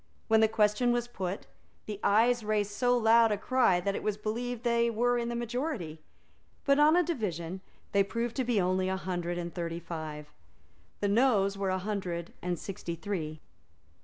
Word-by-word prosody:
When 220 0 +5
the 220 - +5
question 215 +3 +2
was 240 0 0
put, 195 -5 -4 0.4
the 210 -2 -5
Ayes 230 +3 +3
raised 210 -1 0
so 245 +3 +2
loud 225 0 +5
a 210 - +1
cry 245 -5 +3
that 195 +3 -1
it - - -3
was 210 -1 -1
believed 235 +3 -3
that 240 - +1
they 235 0 +3
were 240 +1 +1
the 235 0 -3
majority; 235 - -3 0.7
but 280 0 +4
on 305 +2 +6
a 355 - +4
division 190 - -3 0.3
they 200 0 +4
proved 230 +3 -3
to 260 - +1
be 240 -3 +1
only 185 0 +1
a 190 - -1
hundred 175 -2 -3
and 175 -1 -4
thirty 170 -1 -3
five. 155 -3 -7 0.7
The 205 - +2
Noes 200 -3 +3
were 195 -1 -1
a 185 - +1
hundred 185 -4 -4
and 180 -1 -2
sixty 175 -1 -5
three. 160 -4 -4
210 Hz, 185 wpm, -30 LUFS, 180-235 Hz, 0.7 s, on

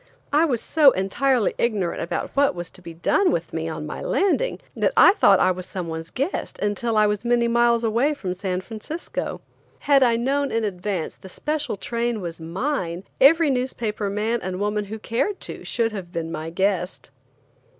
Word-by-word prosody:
I 305 +3 +5
was 250 -8 0
so 305 -3 +5
entirely 235 +5 +1
ignorant 205 -7 0
about 170 - -3
what 280 -5 +3
was 175 -1 -6
to 185 - -14
be 170 -2 -10
done 360 - +2
with - - -2
me - - -2
on - - -5
landing, 450 +6 0 0.2
that - - +1
I - - +8
thought 200 - +5
I - - +4
was 185 0 -5
someone's 165 -3 -5
guest 275 +8 -3
until 210 +2 -1
I 215 - +5
was 210 0 0
many 240 0 +2
miles 235 0 +3
away 235 +7 +2
from 185 -9 -4
San 185 0 -3
Francisco. 225 - -5 0.4
Had 280 -2 +4
I 240 -3 +4
known 275 +4 0
in 225 0 0
advance 190 -3 -3
the 190 - -12
special 295 +1 -3
train 235 +1 -2
was 170 -3 -6
mine, 175 - -2 0.2
every 310 +2 +6
newspaper 235 -5 -2
man 215 +4 0
and 185 0 -4
woman 210 0 -1
who 215 +2 -6
cared 235 - -1
to - - -6
should 230 -1 0
have 190 -5 -7
been 165 -2 -4
my 160 0 -4
guest. 185 +1 -1
215 Hz, 180 wpm, -23 LUFS, 185-260 Hz, 0.4 s, I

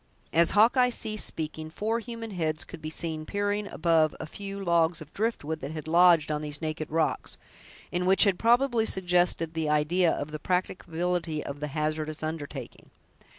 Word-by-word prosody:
As 170 0 +5
Hawkeye 250 +4 +5
ceased 215 -3 -2
speaking, 155 0 -5
four 220 +7 -1
human 230 -1 -7
heads 160 -4 -1
could 175 - -11
be 155 - -4
seen 160 0 -4
peering 205 +3 -1
above 160 -3 +2
a - - -4
few 200 +4 -7
logs 170 -3 +2
of 155 -1 -11
drift 225 -2 -1
wood 160 +2 -3
that 140 +2 -6
had 155 -1 -7
lodged 170 -2 +5
on 150 0 -1
these 150 -1 -3
naked 155 -1 -4
rocks, 160 0 -1 0.6
and 180 +1 0
which 190 +1 +6
had 195 -4 +2
probably 235 -1 +3
suggested 175 -3 +2
the 160 -2 -1
idea 160 +4 +3
of 145 +1 -4
the 155 - -5
practicability 175 -2 -2
of 140 0 -6
the 150 - -3
hazardous 155 +1 -2
undertaking. 150 -5 -6
165 Hz, 175 wpm, -28 LUFS, 155-195 Hz, 0.6 s, which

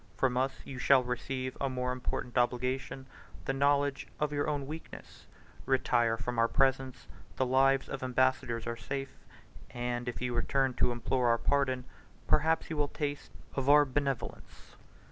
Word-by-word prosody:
From 130 -2 +1
us 130 +1 -1
you 135 -2 -7
shall 130 0 +5
receive 130 +1 -3
a 140 - +1
more 125 -1 -2
important 125 -1 -4
obligation, 125 +2 0 0.4
the 135 - 0
knowledge 140 0 +1
of 150 -1 0
your 145 0 0
own 145 -2 -2
weakness. 155 +3 -10 0.4
Retire 120 -3 +2
from 120 0 -3
our 115 - +5
presence; 135 0 +1 0.3
the 130 - +1
lives 135 +1 +3
of 135 - -5
ambassadors 130 -2 +1
are 115 0 -3
safe; 135 +4 -5 0.6
and, 120 0 -3
if 115 -4 -6
you 125 -1 -2
return 130 +2 +1
to 120 0 +2
implore 120 +1 0
our 115 0 +4
pardon, 130 0 +1 0.4
perhaps 160 +2 +2
you 160 - -3
will 145 -1 +2
taste 145 -1 -4 0.2
of 135 0 -1
our 145 0 +7
benevolence." 135 -2 -4
130 Hz, 160 wpm, -31 LUFS, 125-140 Hz, 0.6 s, our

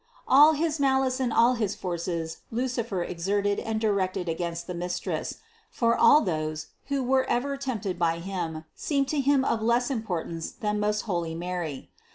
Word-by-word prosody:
All 295 +4 +7
his 310 0 -1
malice 265 -1 +2
and 255 -2 0
all 235 +3 +5
his 215 -5 -1
forces 170 -2 -3
Lucifer 235 -5 -2
exerted 200 +4 -1
and 220 -1 -2
directed 195 -4 0
against 170 0 -3
the 180 - -5
Mistress; 175 +1 -3 0.3
for 230 -1 +2
all 300 - +6
those, 155 -3 -3 0.2
who 280 -1 0
were 260 +1 +2
ever 275 +3 0
tempted 220 -10 -3
by 165 -1 +2
him, 170 -3 -4
seemed 280 -2 0
to 300 - 0
him 275 -1 +3
of 225 - 0
less 240 +3 +2
importance 175 -8 -3
than 210 -1 -2
most 210 0 +1
holy 170 -5 -2
Mary. 170 -5 -4
210 Hz, 165 wpm, -27 LUFS, 175-255 Hz, 0.3 s, All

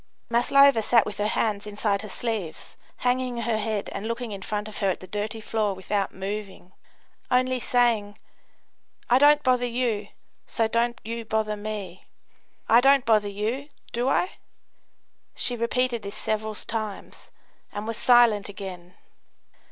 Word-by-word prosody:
Maslova 270 +1 +5
sat 230 +1 +4
with 205 -1 -6
her 210 - +1
hands 215 -2 -1
inside 205 -1 -1
her 215 - -8
sleeves, 205 -7 -4 0.3
hanging 250 0 +1
her 230 -2 0
head 215 -1 -2
and 200 +2 -4
looking 230 0 -3
in 200 -1 -6
front 210 +1 -3
of 215 - -8
her 195 - +2
at 185 - -1
the - - -10
dirty 210 +3 -4
floor 215 -2 -1
without 195 +2 -2
moving, 195 -1 -6 0.6
only 255 0 +2
saying: 230 -5 +1 0.9
"I 250 - +6
don't 295 +1 +6
bother 255 -1 +3
you, 230 -4 -1 0.4
so 225 - 0
don't 235 +1 0
you 230 +1 -4
bother 220 -1 -1
me. 205 -4 -6 0.6
I 235 +2 +6
don't 275 0 +5
bother 215 -2 +3
you, 225 +8 -3 0.2
do 245 +3 0
I?" 360 - 0 1.0
she 245 - 0
repeated 240 0 0
this 200 - -7
several 215 0 -2
times, 215 -1 -6 0.4
and 205 +1 -5
was 230 0 -3
silent 235 -5 +5
again. 185 -3 -8
220 Hz, 150 wpm, -25 LUFS, 205-240 Hz, 1.0 s, I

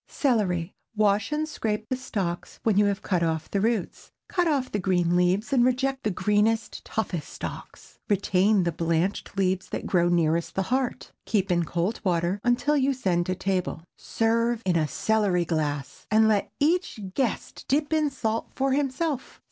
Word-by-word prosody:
CELERY. 195 - 0 0.2
Wash 210 +3 +2
and 305 +1 0
scrape 215 -7 -3
the 255 - -1
stalks 195 -9 -4
when 220 -3 +2
you 205 +1 +5
have 200 0 -1
cut 180 -3 0
off 160 -1 -1
the 200 - 0
roots. 225 -3 -2 0.2
Cut 355 -2 +1
off 275 -5 0
the 205 - -1
green 175 -2 +1
leaves 185 +6 +1
and 250 -3 +5
reject 265 +2 +1
the 215 - 0
greenest, 210 +3 0
toughest 180 -8 -3
stalks. - - -9
Retain 200 0 +3
the 170 - 0
blanched 170 +5 -1
leaves 190 -1 0
that - - -4
grow 175 -2 +2
nearest 170 -1 +1
the 195 - +1
heart. 260 -2 -1 0.2
Keep 195 -4 +1
in 175 -1 +2
cold 175 +7 -1
water 175 0 0
until 245 +5 +2
you 275 -1 +2
send 175 -8 0
to 185 - 0
table. 185 -3 -2
Serve 230 +1 0
in 180 -2 +2
a 155 -2 +2
celery 200 -1 +1
glass, 145 -4 -3
and 220 +1 +5
let 210 -2 +1
each 335 -3 +1
guest 255 -3 -2
dip 295 +3 +1
in 310 -2 +2
salt 225 -4 -2
for 270 0 +1
himself. 275 +1 -1
205 Hz, 170 wpm, -26 LUFS, 180-245 Hz, 0.2 s, you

